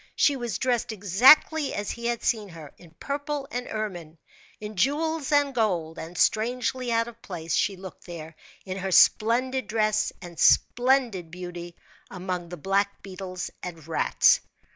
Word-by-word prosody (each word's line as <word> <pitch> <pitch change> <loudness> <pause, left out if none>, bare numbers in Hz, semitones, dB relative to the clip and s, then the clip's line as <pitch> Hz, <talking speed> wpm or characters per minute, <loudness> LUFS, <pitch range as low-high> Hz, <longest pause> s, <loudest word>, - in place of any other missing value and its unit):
She 285 - +3
was 240 -3 -3
dressed 245 -3 0
exactly 250 - +5
as 205 0 -3
he 235 0 -4
had 235 -1 -2
seen 215 -3 0
her, 160 -4 -11
in 170 -3 -17
purple 285 0 -4
and 245 0 -4
ermine, 175 -7 -5 0.4
in 210 0 -7
jewels 300 - 0
and 285 -1 +3
gold; 180 -9 -1
and 165 +2 -8
strangely 245 +4 0
out 230 0 +1
of 235 -1 -12
place 165 -4 -5
she 200 - +1
looked 190 0 -11
there, 160 -2 -8 0.3
in 190 0 -5
her 190 0 -3
splendid 255 +8 +3
dress 215 -1 +1
and 175 -3 -11
splendid 245 -8 +3
beauty, 175 0 -8 0.3
among 180 -2 -5
the 175 - -7
black 200 +4 -1
beetles 185 -2 -6
and 165 -4 -8
rats. 165 - +3
210 Hz, 155 wpm, -26 LUFS, 180-245 Hz, 0.4 s, exactly